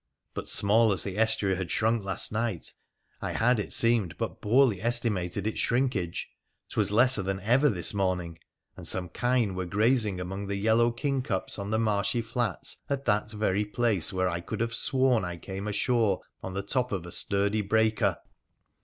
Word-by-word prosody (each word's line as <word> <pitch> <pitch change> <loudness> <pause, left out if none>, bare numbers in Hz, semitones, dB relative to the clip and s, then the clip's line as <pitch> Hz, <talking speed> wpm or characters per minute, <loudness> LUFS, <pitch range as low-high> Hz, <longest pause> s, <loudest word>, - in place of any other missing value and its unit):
But, - - -6
small 110 +2 +4
as 95 - +2
the 95 -2 -5
estuary 110 -3 +1
had 95 -2 -4
shrunk 115 0 +1
last 95 -2 -1
night, 110 -5 -2 0.5
I - - -3
had, 120 0 +2
it 105 - -4
seemed, 115 -7 +2
but - - -4
poorly 115 -3 +3
estimated 105 -5 +1
its 110 - -2
shrinkage. 120 -9 -1 0.4
'Twas - - 0
lesser 120 +1 +4
than 95 0 -2
ever 125 +8 +3
this 90 -5 +2
morning, 90 -4 -2 0.4
and - - -9
some 90 -2 -1
kine 120 -1 0
were 90 -1 -4
grazing 105 0 +1
among 95 +2 -5
the 100 - -2
yellow 110 +4 +3
kingcups 125 -6 -2
on 100 0 -4
the 110 - +1
marshy 110 +1 0
flats 115 -4 -3
at 140 -1 -2
that 105 -1 +1
very 105 -2 0
place 105 -4 +1
where 95 -1 0
I 85 -1 -2
could - - -6
have 115 0 -1
sworn 130 -1 +2
I 90 -1 -4
came 95 +3 -6
ashore 105 -1 +1 0.2
on 95 0 -6
the 100 - -2
top 125 +4 -1
of 95 -4 -3
a 90 - -9
sturdy 100 +4 +1
breaker 110 +1 +1
105 Hz, 180 wpm, -28 LUFS, 95-115 Hz, 0.5 s, small